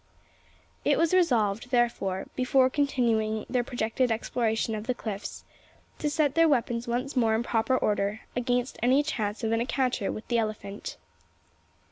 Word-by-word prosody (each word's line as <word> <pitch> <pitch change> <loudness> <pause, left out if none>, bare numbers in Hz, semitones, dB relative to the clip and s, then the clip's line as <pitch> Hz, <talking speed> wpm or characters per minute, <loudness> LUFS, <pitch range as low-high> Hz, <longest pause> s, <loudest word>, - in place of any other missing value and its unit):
It - - +3
was 335 +1 +2
resolved, 240 - +2
therefore, 235 -6 0
before 255 0 +3
continuing 230 -7 +1
their 250 -1 0
projected 240 +1 -1
exploration 225 0 0
of 215 +1 -5
the 250 - 0
cliffs, 210 -4 -6 0.5
to 300 - 0
set 295 -2 +1
their 330 +1 +5
weapons 240 -3 0
once 250 +4 -2
more 225 -3 +3
in 225 - 0
proper 240 +2 +1
order 205 -1 0
against 245 +1 -1
any 260 +4 +4
chance 220 -8 -3
of 225 - 0
an 225 0 +1
encounter 250 -4 0
with 215 - -7
the 235 -1 +2
elephant. 210 -2 -4
240 Hz, 150 wpm, -27 LUFS, 220-255 Hz, 0.5 s, their